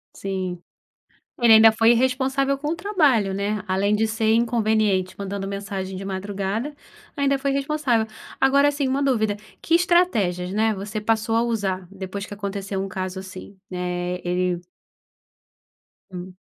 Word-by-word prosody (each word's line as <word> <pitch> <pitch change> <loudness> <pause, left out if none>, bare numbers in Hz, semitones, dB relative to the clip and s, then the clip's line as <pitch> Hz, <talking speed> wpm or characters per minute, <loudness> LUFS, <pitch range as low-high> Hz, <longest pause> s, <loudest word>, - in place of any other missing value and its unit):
Sim. 185 -3 -4 0.8
Ele 235 -2 +7
ainda 220 0 +8
foi 225 +1 +4
irresponsável 265 +3 +1
com 295 +2 -3
o 325 - 0
trabalho, 295 - +2
né. 200 +1 -2
Além 195 +2 +1
de 220 +1 +1
ser 220 0 +1
inconveniente, 215 -5 +1
mandando 200 0 -4
mensagem 195 -1 -4
de 190 - -6
madrugada, 200 +7 -3 0.4
ainda 280 -2 +2
foi 275 +1 -1
irresponsável. 275 -5 0 0.3
Agora 280 +2 +5
assim, 285 -2 -1
uma 270 +2 0
dúvida: 220 -6 +1 0.2
Que 330 - +2
estratégias, 230 - +2
né, 220 +2 +2
você 210 +2 -5
passou 225 +1 0
a 230 - +3
usar 195 -6 -2
depois 195 +1 -6
que - - -9
aconteceu 200 -1 -4
um 195 - -4
caso 185 0 -4
assim, 190 +1 -10
né, 180 0 -3
ele 180 0 0 1.5
Hum. 180 0 -8
210 Hz, 145 wpm, -23 LUFS, 190-255 Hz, 1.5 s, ainda